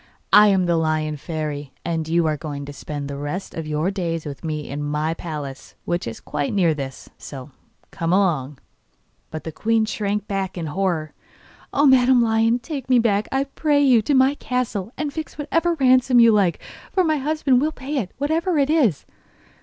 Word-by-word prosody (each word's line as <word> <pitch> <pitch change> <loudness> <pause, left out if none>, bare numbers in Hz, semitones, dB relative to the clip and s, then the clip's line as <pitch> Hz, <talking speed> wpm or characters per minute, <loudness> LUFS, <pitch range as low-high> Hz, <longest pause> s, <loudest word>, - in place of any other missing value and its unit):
I 210 0 +9
am 190 -3 +3
the 170 -1 +2
Lion 155 -1 0
Fairy, 150 -2 -5
and 165 -2 -2
you 165 +1 +2
are 155 -1 +1
going 145 -1 -6
to 145 - -8
spend 145 0 -6
the 140 0 -5
rest 145 +7 -5
of 165 -2 -5
your 155 +5 0
days 170 -4 -3
with 140 -2 -7
me 155 -2 -4
in 145 +2 -5
my 150 +2 -1
palace, 150 -5 -7
which 175 -5 -2
is 115 - -6
quite 145 +6 -3
near 175 -5 +3
this. 135 -3 -7
So 135 0 -9 0.4
come 165 0 -2
along.' 155 -8 +1 0.7
But 155 0 -6
the 160 - -5
queen 220 +6 +1
shrank 210 -1 -2
back 195 -2 -3
in 170 - -3
horror. 160 -2 -2 0.6
'Oh, 290 - +3
Madam 260 -2 +5
Lion, 225 0 +3
take 265 +1 -6
me 255 - +5
back, 215 -3 +2
I 270 +1 +1
pray 290 +1 0
you, 250 -5 +5
to 280 +6 +1
my 265 +1 +5
castle; 245 -7 -3
and 295 -2 -3
fix 315 -1 -6
what 295 0 -6 0.3
ransom 255 -1 +5
you 230 -1 +7
like, 200 -5 +2 0.3
for 375 - +2
my 310 -2 +1
husband 280 -3 +1
will 305 +2 +1
pay 285 0 -5
it, 210 -8 -2
whatever 320 +5 0
it 285 +1 +2
is. 245 - +2
195 Hz, 195 wpm, -22 LUFS, 155-255 Hz, 0.7 s, I